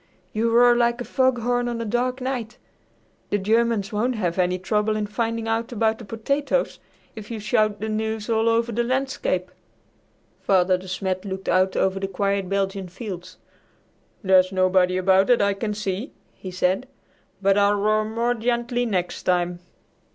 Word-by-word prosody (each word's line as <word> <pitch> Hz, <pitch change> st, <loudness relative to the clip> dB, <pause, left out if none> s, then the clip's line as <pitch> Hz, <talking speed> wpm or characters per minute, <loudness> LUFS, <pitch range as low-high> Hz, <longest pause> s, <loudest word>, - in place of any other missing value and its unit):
"You 225 Hz, +2 st, +1 dB
roar 240 Hz, +1 st, +5 dB
like 235 Hz, 0 st, +2 dB
a -, -, -3 dB
foghorn 245 Hz, -2 st, +1 dB
on 235 Hz, -1 st, -3 dB
a 230 Hz, -, -3 dB
dark 250 Hz, +4 st, -1 dB
night. 245 Hz, -3 st, -4 dB, 0.7 s
The 205 Hz, -, +1 dB
Germans 220 Hz, 0 st, +1 dB
won't 240 Hz, +4 st, 0 dB
have 180 Hz, -4 st, -2 dB
any 180 Hz, 0 st, +2 dB
trouble 210 Hz, +3 st, 0 dB
in 215 Hz, -1 st, -1 dB
finding 225 Hz, +1 st, -2 dB
out 225 Hz, +1 st, -1 dB
about 220 Hz, -1 st, 0 dB
the 230 Hz, -, -9 dB
potatoes 280 Hz, -, -1 dB, 0.4 s
if 215 Hz, -1 st, -9 dB
you 230 Hz, -2 st, -5 dB
shout 215 Hz, -1 st, +1 dB
the 220 Hz, -, -3 dB
news 220 Hz, 0 st, -2 dB
all 225 Hz, 0 st, +2 dB
over 230 Hz, +1 st, +1 dB
the 240 Hz, +2 st, 0 dB
landscape." 250 Hz, -8 st, -1 dB, 0.9 s
Father 185 Hz, -1 st, +3 dB
De 185 Hz, +1 st, -8 dB
Smet 185 Hz, 0 st, -2 dB
looked 190 Hz, -1 st, -6 dB
out 185 Hz, +1 st, +2 dB
over 190 Hz, 0 st, +1 dB
the 195 Hz, -, -2 dB
quiet 195 Hz, 0 st, -1 dB
Belgian 195 Hz, -1 st, -1 dB
fields. 185 Hz, -2 st, -8 dB, 0.9 s
"There's 185 Hz, -1 st, +4 dB
nobody 185 Hz, -1 st, +2 dB
about 190 Hz, +1 st, +4 dB
that 245 Hz, -1 st, +4 dB
I 200 Hz, 0 st, +2 dB
can 210 Hz, +1 st, -3 dB
see," 205 Hz, +4 st, -4 dB, 0.2 s
he 190 Hz, -, -9 dB
said, 185 Hz, +6 st, 0 dB, 0.5 s
"but 195 Hz, 0 st, +3 dB
I'll 205 Hz, 0 st, +4 dB
roar 215 Hz, +1 st, +2 dB
more 230 Hz, +3 st, 0 dB
gently 240 Hz, +1 st, -1 dB
next 180 Hz, -5 st, -2 dB
time." 175 Hz, -1 st, 0 dB
215 Hz, 165 wpm, -23 LUFS, 190-235 Hz, 0.9 s, roar